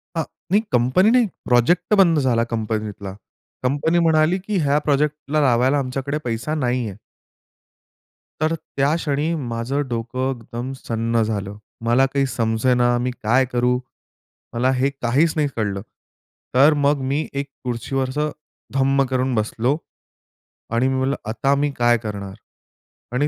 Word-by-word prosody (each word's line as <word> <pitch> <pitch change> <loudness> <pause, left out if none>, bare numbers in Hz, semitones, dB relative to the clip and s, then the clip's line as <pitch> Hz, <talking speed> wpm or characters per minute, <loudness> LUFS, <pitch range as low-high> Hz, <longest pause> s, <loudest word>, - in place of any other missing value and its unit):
अ, 165 - +1 0.3
नाही 205 - +5
कंपनी 130 - +4
नाही, 250 -1 +5 0.2
प्रोजेक्ट 170 - +3
बंद 165 -4 +4
झाला 120 -4 +2
कंपनीतला. 105 -3 -3 0.5
कंपनी 145 +6 +1
म्हणाली 160 +2 +3
की 200 +2 -2
"ह्या 145 +1 +3
प्रोजेक्टला 150 +1 +1
लावायला 130 +1 +3
आमच्याकडे 135 +2 -2
पैसा 120 +6 -2
नाही 125 -3 0
आहे." 100 - -8 1.4
तर 155 +1 +2
त्या 140 0 -1
क्षणी 155 0 -1
माझं 125 0 -2
डोकं 120 +3 -2
एकदम 120 +2 -6
सुन्न 115 0 0
झालं. 105 -2 -3 0.3
मला 120 +3 +4
काही 135 +1 0
समजेना 120 +2 +2
मी 125 - 0
काय 125 +4 +3
करू? 125 0 +2 0.8
मला 125 +3 +2
हे 130 +2 +1
काहीच 140 +7 +2
नाही 150 -2 +2
कळलं. 100 -3 -2 0.7
तर 140 +5 +6
मग 145 0 +2
मी 150 +3 0
एक 140 0 -3 0.2
खुर्चीवर 130 +2 -2
असं 150 +2 -1 0.4
धम्म 135 0 +3
करून 130 0 0
बसलो. 115 +6 0 1.0
आणि 125 +3 +2
मी 130 - 0
बोललं, 135 +2 +1
"आता 135 +5 +1
मी 145 0 0
काय 120 0 +4
करणार?" 100 -3 -5 0.8
आणि 145 +4 +2
130 Hz, 140 wpm, -21 LUFS, 120-145 Hz, 1.4 s, तर